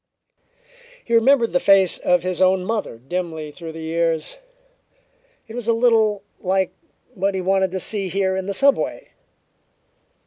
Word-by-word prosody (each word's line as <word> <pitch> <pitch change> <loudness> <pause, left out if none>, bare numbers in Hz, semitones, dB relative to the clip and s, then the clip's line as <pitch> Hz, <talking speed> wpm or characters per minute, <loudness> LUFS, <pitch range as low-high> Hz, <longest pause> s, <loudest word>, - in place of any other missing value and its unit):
He 235 - -4
remembered 230 -1 +4
the 180 - +3
face 195 -2 +4
of 180 0 +2
his 185 0 -2
own 185 0 +3
mother 215 - -3
dimly 160 +3 -5
through 165 +1 -9
the 160 0 -8
years; 165 - -1 1.1
it 220 - -11
was 240 -1 -5
a 230 - +4
little 225 -4 +2 0.2
like 190 0 0 0.4
what 195 -2 -1
he 190 - -1
wanted 190 +1 +1
to 190 +1 -4
see 195 0 -3
here 190 +1 0
in 190 0 -4
the 200 - -2
subway. 280 - +1
190 Hz, 150 wpm, -21 LUFS, 180-220 Hz, 1.1 s, remembered